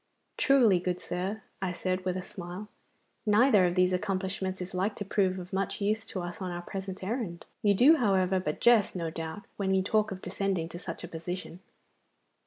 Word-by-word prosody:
'Truly, 240 -9 +5
good 180 0 -2
sir,' 195 +4 -3 0.2
I 190 -2 0
said, 185 +1 -2
with 185 0 0
a 185 - -4
smile, 185 +3 -7 0.6
'neither 210 -3 +5
of 175 - -1
these 185 0 +3
accomplishments 190 0 -2
is 180 0 -6
like 190 +3 0
to 205 - -5
prove 190 -1 +1
of 180 0 -8
much 195 0 -1
use 215 +2 0
to 185 - -4
us 175 +2 -6
on 185 - -2
our 175 0 -5
present 190 0 -6
errand. 195 -5 -3 0.2
You 205 -1 +4
do, 290 +10 +7
however, 190 -5 +2
but 150 -4 -3
jest, 235 -5 +5
no 165 -2 -2
doubt, 165 +4 -5
when 190 -1 +1
you 190 - +2
talk 215 +2 +1
of 190 - -5
descending 185 -3 -1
to 175 - -7
such 175 - -6
a - - -5
position. 175 +1 -6
190 Hz, 195 wpm, -29 LUFS, 180-205 Hz, 0.6 s, do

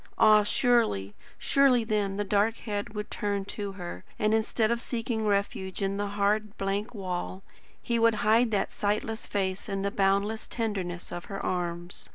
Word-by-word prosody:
Ah 215 0 +7
surely, 210 - +2 0.2
surely 270 -4 +4
then, 205 -3 0
the 205 - 0
dark 205 +3 +2
head 210 -1 -4
would 210 0 -4
turn 200 -1 -1
to 200 -1 -5
her, 175 - -7
and 215 0 +2
instead 220 0 +1
of 235 0 0
seeking 230 -2 -2
refuge 200 -1 -1
in 195 0 0
the 205 0 -1
hard, 205 +1 0
blank 200 +4 -2
wall, 185 -1 -4 0.4
he 235 -1 -1
would 230 -1 +4
hide 225 +3 +5
that 205 -3 0
sightless 215 +2 -1
face 190 0 -2
in 195 -1 -2
the 200 - 0
boundless 200 +3 +1
tenderness 190 -6 -3
of 175 0 -5
her 195 -1 -5
arms. 175 -1 -3
205 Hz, 170 wpm, -28 LUFS, 195-220 Hz, 0.4 s, Ah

